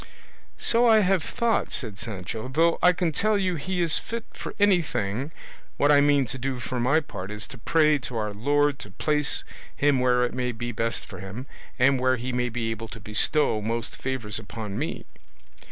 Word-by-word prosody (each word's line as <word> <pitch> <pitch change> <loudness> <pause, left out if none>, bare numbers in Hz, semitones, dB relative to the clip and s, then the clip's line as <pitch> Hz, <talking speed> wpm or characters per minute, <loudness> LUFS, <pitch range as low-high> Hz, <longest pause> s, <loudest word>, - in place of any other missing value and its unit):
"So 235 +1 +3
I 220 -1 +6
have 190 -3 +2
thought," 235 -1 0
said 105 -6 -5
Sancho; 110 +2 -5
"though 165 +6 +2
I 180 - +7
can 175 -2 0
tell 215 +6 +1
you 190 -2 0
he 175 +4 -1
is 165 -2 +2
fit 230 0 -5
for - - -7
anything: 135 - +1 0.5
what 145 +1 +4
I 145 -1 +6
mean 145 -1 +4
to 130 +3 -6
do 130 0 -2
for 125 0 -3
my 135 +7 +3
part 95 -10 -7
is 105 +1 -5
to 135 - -10
pray 150 +4 +3
to 120 -1 -5
our 105 -1 -2
Lord 145 +6 +1
to - - -9
place 150 -2 +1 0.3
him 140 -2 +3
where 125 -1 +3
it 120 - -4
may 125 -1 -1
be 120 +2 -4
best 115 +1 -2
for 90 - -10
him, 100 +7 -7 0.3
and 135 +1 +4
where 130 0 +3
he 125 +2 -4
may 125 0 0
be 115 -1 -2
able 115 0 -5
to 110 - -9
bestow 105 +3 +1
most 115 +2 -3
favours 125 -6 -3
upon 105 -1 -6
me." - - -4
130 Hz, 200 wpm, -26 LUFS, 115-150 Hz, 0.5 s, I